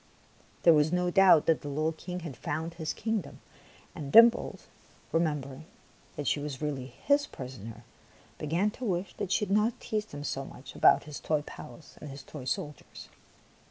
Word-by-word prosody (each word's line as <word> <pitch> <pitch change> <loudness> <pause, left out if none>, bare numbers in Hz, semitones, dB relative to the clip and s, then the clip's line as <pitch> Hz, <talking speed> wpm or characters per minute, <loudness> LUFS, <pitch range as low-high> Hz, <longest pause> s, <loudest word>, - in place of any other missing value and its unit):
There 170 - +8
was 150 0 +3
no 180 0 +1
doubt 190 -5 +6
that 160 - +2
the - - -7
little 155 +3 0
King 180 +3 -6
had 160 -6 -7
found 160 +6 -4
his 160 -2 -3
kingdom; 220 -7 -3 0.5
and 140 -2 -6
Dimples, 235 +1 +6 0.5
remembering 150 -3 -1 0.5
that 145 - -4
she 145 - +1
was 145 -2 -5
really 140 -4 -3 0.2
his 285 0 +3
prisoner, 115 -3 -9 0.6
began 170 +8 0
to 255 - -10
wish 185 -4 -1
that 200 -3 -3
she 210 - +2
had 195 - +1
not 215 +3 +1
teased 215 0 -3
him 145 0 -7
so 135 -1 -3
much 135 0 -11
about - - +5
his 150 -1 -8
toy 155 -2 0
palace 155 +1 -12
and 150 - -7
his 135 0 -9
toy 140 -3 -9
soldiers. 145 +3 -5
155 Hz, 175 wpm, -29 LUFS, 145-185 Hz, 0.6 s, There